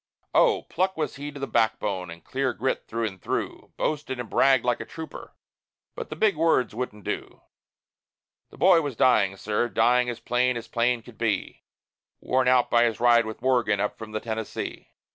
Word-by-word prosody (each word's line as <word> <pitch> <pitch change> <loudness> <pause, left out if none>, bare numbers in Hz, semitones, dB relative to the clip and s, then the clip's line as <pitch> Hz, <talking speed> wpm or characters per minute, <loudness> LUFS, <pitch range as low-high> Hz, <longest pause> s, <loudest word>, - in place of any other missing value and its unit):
Oh! - - +4
pluck 185 +1 -1
was 155 -3 -3
he 145 +1 -6
to 145 - -10
the 135 - -2
backbone, 110 -7 0
and 85 0 -10
clear 135 -1 -1
grit 130 - -2
through 115 0 -2
and 95 -4 -6
through; - - -4
Boasted 145 -4 -2
and 120 - -4
bragged 135 -3 +4
like 120 -1 +1
a - - -4
trooper, 160 -1 -9 0.6
but - - -7
the - - -5
big 215 -3 +2
words 155 -8 +2
wouldn't 105 -3 -5
do; - - -5 1.1
The - - -16
boy 180 -2 +5
was 145 -5 -4
dying, 100 -6 +3
sir, 105 +4 -1
dying, 125 +2 +3
as 120 - -5
plain 125 0 +1
as 115 - -7
plain 120 0 0
could 120 -1 -15
be, 115 -3 -2 0.6
Worn 130 0 +1
out 125 -1 +3
by 120 0 +5
his 115 -3 -1
ride 120 -1 +4
with 110 +2 -8
Morgan 120 -6 +2
up 105 +1 -1
from 110 -1 -8
the 110 - -2
Tennessee. 110 -1 -5
120 Hz, 190 wpm, -26 LUFS, 110-130 Hz, 1.1 s, boy